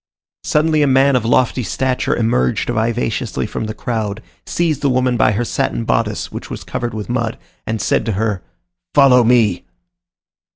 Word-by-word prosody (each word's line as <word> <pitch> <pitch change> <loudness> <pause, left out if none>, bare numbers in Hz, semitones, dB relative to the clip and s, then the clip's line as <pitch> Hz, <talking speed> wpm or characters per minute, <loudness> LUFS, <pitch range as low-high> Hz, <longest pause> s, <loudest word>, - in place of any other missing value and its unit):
Suddenly 155 0 +2
a 145 - +3
man 135 +1 +4
of 120 -3 +1
lofty 125 +2 +2
stature 130 +2 -1
emerged 65 - 0
vivaciously 115 0 -1
from - - -4
the 110 - -5
crowd, 110 -2 -3 0.2
seized 160 -5 0
the 140 - +2
woman 125 -1 +1
by 110 - +3
her 120 +4 -1
satin 115 - -1
bodice, 110 -2 -1
which - - -7
was - - -6
covered 120 -1 -4
with 105 -1 -5
mud, 120 -2 -2 0.3
and 110 0 -2
said 105 - +1
to 110 - 0
her, 105 -1 -1 0.5
"Follow 130 -3 +6
me!" 115 -6 +3
120 Hz, 165 wpm, -18 LUFS, 110-130 Hz, 0.5 s, Follow